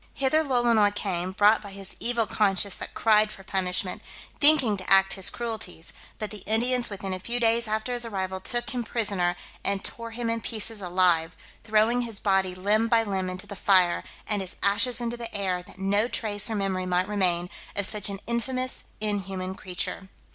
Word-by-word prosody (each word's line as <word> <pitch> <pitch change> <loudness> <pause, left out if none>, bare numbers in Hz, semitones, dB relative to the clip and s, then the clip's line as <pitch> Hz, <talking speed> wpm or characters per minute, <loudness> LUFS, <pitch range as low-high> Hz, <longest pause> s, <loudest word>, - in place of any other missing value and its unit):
Hither 275 +4 +2
Lolonois 235 -6 +2
came 185 -3 -3
(brought 210 +3 +4
by 200 -2 -10
his 195 -1 -8
evil 235 -1 0
conscience 200 -2 +1
that - - -8
cried 215 -1 +3
for 195 - -11
punishment), 185 -1 -1 0.4
thinking 285 -8 +7
to 185 - -7
act 195 0 +5
his 190 - +1
cruelties; 220 -8 -6 0.2
but 215 -2 -4
the 210 - -7
Indians 240 +3 +1
within 195 -2 -5
a 185 - -4
few 235 +6 0
days 230 0 +3
after 220 +3 -2
his 240 0 -2
arrival 190 -4 -3
took 240 +5 -1
him 245 -1 -3
prisoner, 200 -7 0 0.3
and 200 -1 +2
tore 230 0 -5
him 230 +1 -4
in 230 0 -1
pieces 220 -1 -3
alive, 175 -3 +2 0.3
throwing 225 +2 +2
his 230 -4 -5
body 190 -2 +1
limb 210 +4 +2
by 230 -1 +3
limb 190 -3 -2
into 185 +2 -6
the 200 0 -8
fire, 185 -3 +3 0.2
and 210 -2 +1
his 185 -1 -5
ashes 230 +5 +3
into 240 0 -3
the 235 -1 -5
air, 185 -3 0
that 180 - -14
no 200 +3 +2
trace 210 -3 -2
or 220 - -2
memory 190 -2 -1
might 180 +1 +1
remain 180 -4 +2 0.3
of 200 - +3
such 210 0 +2
an 195 -1 -5
infamous, 255 +2 -2 0.2
inhuman 195 -3 -2
creature. 190 +1 -4
205 Hz, 190 wpm, -26 LUFS, 190-230 Hz, 0.4 s, thinking